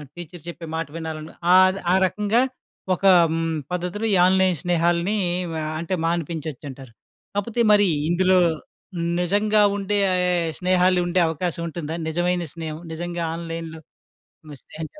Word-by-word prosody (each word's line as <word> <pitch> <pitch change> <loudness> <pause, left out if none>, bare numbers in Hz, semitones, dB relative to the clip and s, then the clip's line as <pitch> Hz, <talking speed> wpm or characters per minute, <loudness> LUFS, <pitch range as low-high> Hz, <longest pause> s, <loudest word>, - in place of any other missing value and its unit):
Teacher 175 -1 -10
చెప్పే 170 -1 -7
మాట 165 -1 -2
వినాలంటే 160 -1 -6 0.2
ఆహ్, 185 +1 +5
ఆ - - +5
రకంగా 210 +5 +1 0.5
ఒక 195 - -16 0.7
పద్ధతిలో 180 +5 -3
ఈ - - +5
ఆన్‌లైన్ 185 -2 +3
స్నేహాల్ని 175 +3 +1 0.5
ఆహ్, 155 - -3
అంటే 170 +3 -4
మాన్పించొచ్చంటారు. 150 -6 -4 0.4
కాపోతే 230 +3 -1
మరి 205 -1 +5 0.2
ఇందులో 185 +2 +3 0.8
నిజంగా 205 +4 +2
ఉండే 205 0 -1 0.6
స్నేహాలు 185 0 +3
ఉండే 175 +1 +1
అవకాశం 170 +1 -3
ఉంటుందా? 160 -1 -5
నిజమైన 175 +2 0
స్నేహం. 160 -1 -6
నిజంగా 175 +1 -4
ఆన్‌లైన్‌లో 165 -1 -6 0.8
స్నేహం 160 +1 -8
175 Hz, 115 wpm, -23 LUFS, 165-185 Hz, 0.8 s, ఆహ్